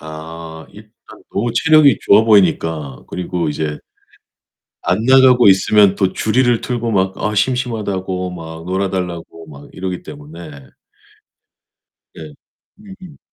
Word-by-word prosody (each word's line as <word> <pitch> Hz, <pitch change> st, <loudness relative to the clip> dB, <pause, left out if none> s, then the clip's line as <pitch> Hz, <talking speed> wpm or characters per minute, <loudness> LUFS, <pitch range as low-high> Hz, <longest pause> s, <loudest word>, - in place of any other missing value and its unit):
아, 80 Hz, +1 st, -10 dB
일단 105 Hz, 0 st, -15 dB, 0.4 s
너무 115 Hz, +3 st, -2 dB
체력이 150 Hz, -3 st, +4 dB
좋아 105 Hz, +2 st, +5 dB
보이니까. 80 Hz, -, +1 dB
그리고 90 Hz, -2 st, -3 dB
이제. 75 Hz, 0 st, -4 dB, 1.1 s
안 90 Hz, +3 st, +1 dB
나가고 130 Hz, -2 st, +5 dB
있으면 100 Hz, +1 st, +4 dB
또 95 Hz, -2 st, 0 dB
주리를 120 Hz, +1 st, +1 dB
틀고 120 Hz, -2 st, -3 dB
막 95 Hz, -1 st, 0 dB
아 105 Hz, 0 st, -2 dB
심심하다고 105 Hz, -6 st, -2 dB
막 80 Hz, -2 st, -9 dB
놀아 95 Hz, +2 st, -1 dB
달라고 85 Hz, -3 st, -6 dB
막 70 Hz, -1 st, -13 dB
이러기 90 Hz, -1 st, -5 dB
때문에 75 Hz, -2 st, -12 dB, 1.5 s
네. 75 Hz, -2 st, -11 dB, 0.4 s
음음. 190 Hz, -6 st, -14 dB
95 Hz, 250 characters per minute, -17 LUFS, 80-115 Hz, 1.5 s, 좋아